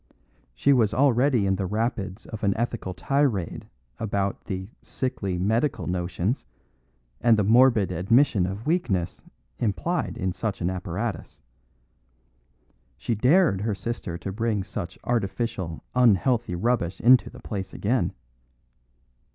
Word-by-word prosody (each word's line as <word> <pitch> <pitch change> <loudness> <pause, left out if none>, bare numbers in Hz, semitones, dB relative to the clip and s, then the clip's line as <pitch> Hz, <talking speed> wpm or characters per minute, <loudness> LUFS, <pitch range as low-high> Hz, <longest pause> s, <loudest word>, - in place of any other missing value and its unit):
She 140 - +4
was 110 -5 +2
already 130 -4 +3
in 95 0 +1
the 95 -1 -2
rapids 105 -1 -2
of 110 -1 -8
an 100 0 +2
ethical 115 -5 -3
tirade 105 - 0 0.3
about 100 -2 -2
the 95 0 -4
"sickly 100 -8 -3
medical 110 +10 0
notions" 90 +5 -2 0.8
and 115 -2 +5
the 105 - +2
morbid 115 -2 +5
admission 100 - +3
of 100 +4 -6
weakness 120 - 0 0.4
implied 160 - -1
in 95 -1 -1
such 100 +2 -3
an 90 +1 0
apparatus. 95 +4 -4 1.6
She 120 - -2
dared 125 - +3
her 105 -1 -1
sister 95 -4 -4
to 95 - -5
bring 110 -1 -1
such 90 -2 -6
artificial, 100 -6 -2
unhealthy 120 -3 +3
rubbish 100 -3 0
into 125 +1 +5
the 125 - -13
place 100 -6 -5
again. 120 +5 0
105 Hz, 125 wpm, -25 LUFS, 95-120 Hz, 1.6 s, and